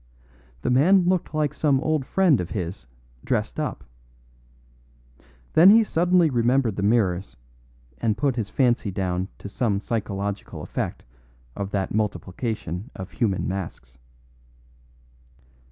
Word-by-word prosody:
The - - +1
man 175 +9 +5
looked 180 -1 +1
like 150 -2 0
some 145 -4 +2
old 155 -2 -1
friend 175 - +3
of 90 - -5
his 85 - -5 0.4
dressed - - -1
up. - - -3 1.7
Then 170 +4 +8
he 225 +2 +7
suddenly 175 -3 +3
remembered 120 -2 +2
the 100 - -3
mirrors, 100 - +1 0.6
and 110 -2 0
put 135 +1 +1
his 110 -4 -3
fancy 120 -5 +1
down 95 -1 -2
to - - -8
some 100 -1 0
psychological 100 -2 -4
effect - - -4 0.5
of 100 -1 -4
that 100 -1 -2
multiplication 105 - -3
of 95 0 -8
human 105 -6 0
masks. 80 -9 -6
110 Hz, 120 wpm, -24 LUFS, 95-140 Hz, 1.7 s, Then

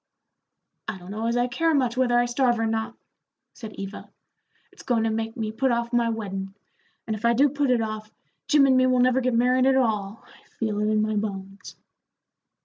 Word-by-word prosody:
"I 190 - -4
don't 180 +1 -11
know 220 +2 -3
as 235 +1 0
I 245 - +2
care 320 +6 +1
much 250 -4 +1
whether 250 -1 +2
I 240 - +3
starve 240 0 +1
or 225 - 0
not," 220 0 -2 0.6
said 220 -4 -9
Eva. 195 +1 -8 0.6
"It's - - -15
goin' 235 -3 0
to 225 - 0
make 225 0 -3
me 220 -2 -3
put 265 +4 0
off 235 0 -1
my 235 -1 +2
weddin'; 195 -3 -5 0.5
and 220 - -2
if 215 - -10
I 235 0 +4
do 275 +5 +4
put 285 0 -1
it 240 -2 +2
off, 215 -1 -6 0.4
Jim 290 -1 +5
and 265 -1 +4
me 255 0 +4
will 255 -1 +2
never 255 +1 +3
get 255 -1 0
married 250 +2 +3
at 270 - +4
all; 215 -4 -1
I - - -22
feel 215 -3 -2
it 210 - 0
in 215 0 +2
my 215 0 -1
bones." 195 -1 -5
230 Hz, 215 wpm, -25 LUFS, 215-255 Hz, 0.6 s, Jim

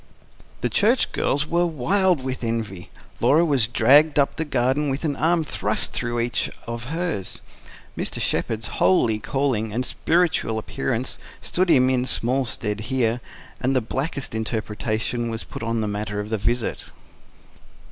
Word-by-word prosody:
The - - 0
Church 230 +5 +3
girls 145 +2 +1
were 175 +3 +1
wild 170 +1 +2
with 130 -1 -4
envy. 110 -6 -3 0.3
Laura 160 +4 +4
was 135 -8 +2
dragged 145 +5 +5
up 140 -1 +3
the 160 - -2
garden 135 +1 +1
with 135 +3 -3
an 145 -2 0
arm 165 +3 +2
thrust 150 - -2
through 120 0 -2
each 120 0 -1 0.2
of 115 0 -5
hers. 160 - -3 0.6
Mr. - - -3
Shepherd's 110 0 0 0.2
holy 105 +4 +4
calling 120 -3 -1
and 125 +4 -1
spiritual 165 -8 +1
appearance 130 +2 -2 0.2
stood 185 0 0
him 130 -4 +5
in 125 -1 +1
small 130 +1 +1
stead 105 -3 -1
here; 125 -2 +1 0.4
and 130 +2 0
the - - +5
blackest 135 +4 -3
interpretation 110 +1 -2
was 115 0 -4
put - - -9
on 115 0 -1
the 105 - -1
matter 105 0 -3
of 105 +1 -5
the 110 - +1
visit. 120 +2 -1
125 Hz, 155 wpm, -23 LUFS, 110-145 Hz, 0.6 s, dragged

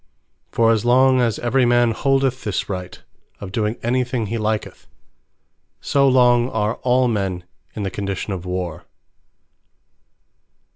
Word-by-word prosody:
For 115 0 +3
as 110 -2 +1
long 130 +1 +4
as 115 -4 0
every 125 +2 +1
man 120 -1 +3
holdeth 135 +1 0
this 105 -4 -2
Right, 90 -2 -6 0.4
of 100 -2 -8
doing 110 +2 -1
any 125 +2 +1
thing 125 -2 -3
he 115 +3 -3
liketh; 110 0 -3 0.9
so 140 -1 +2
long 125 -1 +4
are 110 -1 -1
all 125 0 +2
men 95 -5 -2 0.3
in 105 - -4
the 95 - -3
condition 100 +1 -4
of 90 -2 -6
Warre. 90 -2 -5
115 Hz, 140 wpm, -20 LUFS, 100-125 Hz, 0.9 s, long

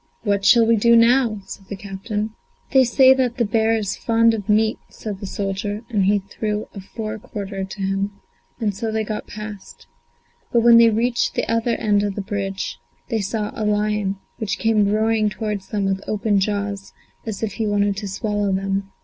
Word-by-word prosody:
"What 200 -2 +1
shall 230 +4 +6
we 230 0 +4
do 235 +3 +5
now?" 230 -2 +4
said 195 0 -10
the 200 - -4
captain. 205 +2 -4 0.4
"They 265 -2 +6
say 260 +2 +6
that 255 -2 0
the 235 - +2
bear 220 +1 +2
is 205 -3 -2
fond 230 0 +3
of 210 -2 -5
meat," 220 +1 +3
said 205 -3 -7
the 195 - -6
soldier, 205 +2 -3
and 210 -3 +2
then - - +3
he 205 +2 +4
threw 210 +2 -3
a 200 - -7
fore 215 +2 -6
quarter 195 -1 -5
to 190 +1 -7
him, 195 +1 -1 0.5
and 215 -3 0
so 220 +3 -3
they 220 0 0
got 215 0 -5
past. 210 -2 -9 0.7
But 235 - +4
when 235 0 +8
they 230 0 +7
reached 235 +2 0
the - - -1
other 230 +1 +1
end 205 -2 +2
of 205 -1 -2
the 205 - -2
bridge, 195 -1 -4 0.3
they 225 -3 0
saw 210 +1 -2
a - - -6
lion, 210 -1 0 0.2
which 215 -4 -2
came 215 -2 +2
roaring 215 0 +2
towards 210 -2 -4
them 205 -2 -1
with 195 0 0
open 210 -1 +1
jaws 200 0 -2 0.3
as 220 -1 -4
if 210 -3 -2
he 220 -2 -2
wanted 205 -1 +1
to 205 0 -4
swallow 205 +1 -1
them. 195 +1 -1
210 Hz, 200 wpm, -21 LUFS, 200-225 Hz, 0.7 s, when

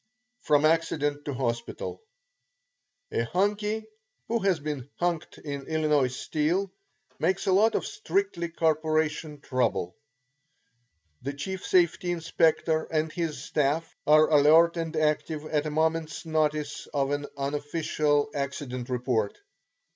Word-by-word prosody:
FROM 150 0 +3
ACCIDENT 145 -2 +1
TO 145 - -3
HOSPITAL 120 - -3 1.1
A 115 - +1
"Hunkie" 210 - 0 0.4
who 235 +1 +1
has 195 -5 +2
been 140 -3 -5
"hunked" 175 -2 -2
in 140 -2 -6
Illinois 150 -5 +2
Steel 165 +8 -1 0.5
makes 190 0 +1
a 190 - +2
lot 210 +4 +4
of - - 0
strictly 395 - -1
corporation 155 -2 0
trouble. 120 -10 -1 1.3
The 140 +3 -4
chief 190 +7 -5
"safety 175 0 +2
inspector" 165 -1 +1
and 155 0 -1
his 165 -3 -3
staff 150 +3 0
are 155 +1 +7
alert 155 +3 +6
and 165 -1 -3
active 155 0 0
at 155 -1 0
a - - -1
moment's 160 +1 -1
notice 150 -2 -1
of 140 -1 0
an 145 0 -2
unofficial 145 +1 0
accident 135 -3 -4
report. 125 -4 0
155 Hz, 120 wpm, -27 LUFS, 145-165 Hz, 1.3 s, are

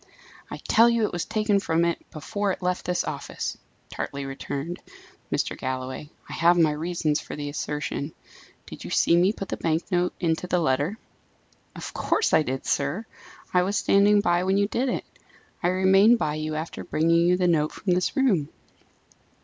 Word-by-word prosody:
"I - - -6
tell 230 +1 +4
you 235 -2 +2
it - - -3
was 175 -1 -2
taken 215 -2 +1
from 165 -3 +1
it 170 - -3
before 200 +6 -2
it 185 - -6
left 180 0 -1
this 180 0 0
office," - - -4 0.4
tartly 140 0 -4
returned 140 +4 -5 0.5
Mr. - - -1
Galloway. 130 +2 -4 0.2
"I - - -8
have 175 +1 +4
my 160 -3 +4
reasons 155 -1 -1
for - - -8
the 145 -1 -4
assertion. 150 0 -3 0.5
Did - - -10
you - - -7
see 170 - +3
me 180 +3 +4
put 195 -3 -7
the - - -3
bank 165 0 0
note 180 0 +1
into 165 +1 0
the 180 - +1
letter?" 155 +5 0 0.8
"Of - - -7
course 435 - 0
I 160 - +6
did, 135 -2 -3
sir. 145 +11 -1 0.5
I 180 - +5
was 195 +3 0
standing 205 +1 +4
by 175 -2 +2
when 190 +1 +2
you 200 0 +2
did 250 +5 -1
it: - - -2 0.6
I 175 - +1
remained 190 +5 +5
by 150 -8 -1
you 155 0 -3
after 160 +2 -5
bringing 165 +2 +2
you 180 0 +4
the 180 -1 +2
note 155 -3 +2
from 185 - -1
this 180 0 0
room." 195 - +2
175 Hz, 185 wpm, -25 LUFS, 155-195 Hz, 0.8 s, I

